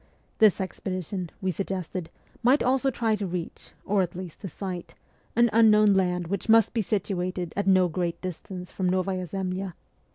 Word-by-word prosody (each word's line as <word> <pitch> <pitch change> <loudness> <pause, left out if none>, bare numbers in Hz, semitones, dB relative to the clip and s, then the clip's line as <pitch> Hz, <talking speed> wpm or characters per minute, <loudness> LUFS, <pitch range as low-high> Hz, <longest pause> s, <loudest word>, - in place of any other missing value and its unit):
This 215 -4 +6
expedi 185 -1 -4
tion, 185 -4 -4
we 190 -1 0
suggested, 185 -2 -4 0.3
might 255 +5 +4
also 265 +2 +2
try 225 -3 +1
to 205 -2 -3
reach, 175 -1 -5 0.2
or 205 0 +2
at 175 -2 -2
least 180 -2 -8
to 195 - -5
sight, 180 0 -6 0.4
an 235 +1 +5
unknown 215 -2 +6
land 180 -2 +1
which 200 +5 -3
must 225 -1 +5
be 230 - +1
situated 185 -3 -2
at 200 0 -1
no 185 -1 +5
great 170 0 -2
distance 180 0 -7
from 185 -2 -1
Novaya 185 0 -1
Zemlya. 185 0 -3
190 Hz, 170 wpm, -26 LUFS, 180-210 Hz, 0.4 s, This